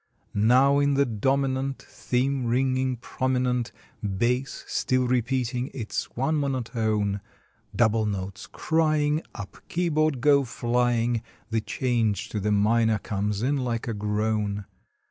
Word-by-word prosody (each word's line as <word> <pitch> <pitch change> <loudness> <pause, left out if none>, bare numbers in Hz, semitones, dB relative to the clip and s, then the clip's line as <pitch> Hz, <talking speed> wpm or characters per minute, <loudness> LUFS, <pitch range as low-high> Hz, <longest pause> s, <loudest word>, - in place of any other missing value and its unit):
Now 130 +7 +4
in 140 0 +2
the 140 0 +4
dominant 135 +3 0
Theme 130 0 -1
ringing 130 +1 +1
prominent, 125 -1 -1 0.3
Bass 120 +6 -1
still 130 -1 +1
repeating 125 +1 0
its 115 -5 -3
one 140 +5 +1
monotone, 110 -7 -1 0.5
Double 110 -2 +3
notes 95 -1 -4
crying, 155 -1 +1
Up 105 -4 -8
keyboard 155 -5 +1
go 140 +2 +5
flying, 120 -1 0 0.3
The 110 -1 +1
change 115 -3 0
to 105 - -3
the 105 +1 0
minor 110 +2 +3
comes 105 0 -2
in 140 +3 +1
like 120 -3 -2
a 115 - -1
groan. 105 -1 -1
120 Hz, 120 wpm, -26 LUFS, 110-135 Hz, 0.5 s, go